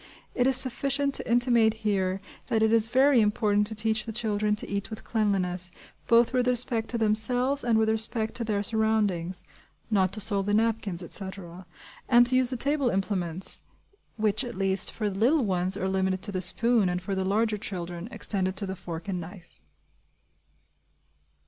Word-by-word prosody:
It 250 0 +1
is 265 - +6
sufficient 275 +2 +2
to - - 0
intimate 235 -2 +3
here 190 -2 -1 0.3
that 220 -1 +1
it 220 0 +2
is 225 -1 +5
very 260 +1 +4
important 210 -1 +1
to 220 - -5
teach 220 0 0
the - - -4
children 210 -2 -1
to 210 - -1
eat 200 +1 -4
with 220 - -8
cleanliness, 185 -5 -1 0.4
both 235 +1 +3
with 250 -1 +1
respect 240 -2 -1
to 240 - -2
themselves 245 +5 +1
and 235 -2 +2
with 220 0 +2
respect 220 0 0
to 240 - -3
their 210 -2 -2
surroundings 210 -5 -1 0.5
(not 190 -3 +2
to 220 - -3
soil 200 -1 0
the 205 +1 -1
napkins, 215 -5 0
etc.), 185 -1 -5 0.4
and 240 -1 +6
to 255 +1 +6
use 255 -1 +3
the 255 - -3
table 280 0 +1
implements 190 -3 0 0.6
(which, 215 -1 0
at 240 -6 -7
least, 195 0 +1
for 215 - -3
the 195 -1 -5
little 260 +4 +2
ones, 185 0 -1
are 190 - -2
limited 190 -1 -1
to 205 - -1
the 185 -2 -3
spoon, 220 +2 +3
and 180 0 -2
for 195 +1 -4
the 190 0 -1
larger 210 +2 0
children 175 -1 -6
extended 190 -6 -2
to 200 - -2
the 190 0 -5
fork 170 -1 -8
and 185 -3 -3
knife). 175 +1 -13
215 Hz, 180 wpm, -26 LUFS, 190-230 Hz, 0.6 s, is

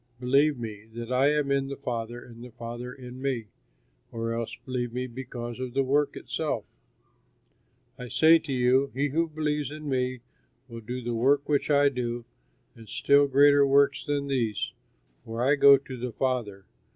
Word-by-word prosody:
Believe 140 +3 +3
me, 110 -2 -7
that 120 +1 -6
I 135 +3 +4
am 150 -2 0
in 135 -1 +1
the 140 - -5
Father 120 -3 -4
and 115 0 -12
the 125 - -9
Father 120 +2 -7
in 125 0 -10
me, 130 -5 -2 0.7
or 115 0 -3
else 115 -1 -4
believe 125 -2 -3
me 125 +2 -3
because 120 -1 -7
of 130 -1 -5
the 135 - +3
work 145 +2 +1
itself. - - -3 1.3
I 125 - -6
say 160 +6 +5
to 155 -3 -7
you, 130 +2 +3
he 145 +2 0
who 165 +4 0
believes 150 -2 -2
in 150 0 -8
me 130 -2 -1 0.5
will 115 -2 -9
do 125 +3 -6
the 120 0 -2
work 135 +5 +2
which 145 0 +1
I 145 -1 +5
do 120 -2 -4 0.5
and 115 -2 -15
still 140 0 +4
greater 140 +1 +5
works 140 +1 +3
than 145 -1 -1
these, 120 -7 -1 0.5
for 115 0 -6
I 135 +3 +4
go 140 -1 +8
to 135 -1 -9
the 125 0 -4
Father. 115 -7 -2
130 Hz, 175 wpm, -27 LUFS, 120-140 Hz, 1.3 s, go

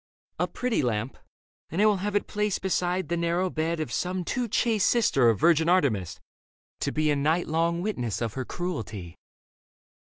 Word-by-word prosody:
" - - -51
A - - +1
pretty 250 -2 -1
lamp, 120 -1 -1 0.5
and 165 - -3
I 210 - +5
will 210 -2 +4
have 205 +2 -3
it 205 - +1
placed 210 -2 -2
Beside 180 -2 0
the 170 - -1
narrow 170 +2 0
bed 160 +1 -1
of 155 -6 -3
some 180 +7 -2
too 250 +4 -1
chaste 220 -2 +2
Sister 140 - +4
of 110 -4 +1
virgin 165 +2 +4
Artemis, 105 - +1 0.6
to - - -1
be 155 0 +1
A - - +2
night 155 +5 +1
long 170 +2 0
witness 125 - -2
of 115 -3 -2
her 130 - -3
cruelty. 110 - -5
170 Hz, 185 wpm, -27 LUFS, 130-190 Hz, 0.6 s, I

